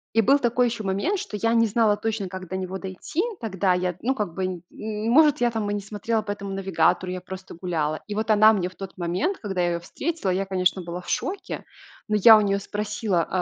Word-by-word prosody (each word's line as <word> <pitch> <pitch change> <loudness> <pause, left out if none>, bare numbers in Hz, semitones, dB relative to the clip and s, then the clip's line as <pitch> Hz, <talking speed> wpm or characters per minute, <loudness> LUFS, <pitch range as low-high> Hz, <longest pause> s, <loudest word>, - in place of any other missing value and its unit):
И 225 - +6
был 275 +6 +4
такой 245 0 +2
ещё 230 -2 -4
момент, 200 - 0
что 215 - -5
я 230 +3 +1
не 230 -1 +4
знала 215 -1 +3
точно, 220 -2 -2
как 185 0 -7
до 185 - -4
него 190 0 -4
дойти. 190 - -4 0.2
Тогда 190 -4 +1
я, 180 -1 -1
ну, 260 +3 +1
как 210 -8 -3
бы, 185 -1 -3
и 215 +1 -4
может, 300 +2 +5
я 240 - +4
там 220 -2 -2
и - - -1
не 205 - -1
смотрела 215 +2 -2
по 210 -1 -4
этому 200 -1 -5
навигатору, 180 -1 +1
я 185 - -5
просто 185 +1 -9
гуляла. 155 -4 -1
И 210 - -4
вот 220 +1 -2
она 215 +1 +7
мне 185 -4 0
в 185 - -12
тот 195 -1 -8
момент, 180 - -1
когда 190 -4 -3
я 175 0 +1
ее 170 - -2
встретила, 310 - -3
я, 190 +2 0
конечно, 185 0 +1
была 175 0 -5
в - - -16
шоке, 380 +1 -3 0.5
но 215 - +2
я 220 +2 +9
у - - +3
нее 200 -1 +1
спросила: 205 -3 -1
200 Hz, 235 wpm, -24 LUFS, 185-225 Hz, 0.5 s, я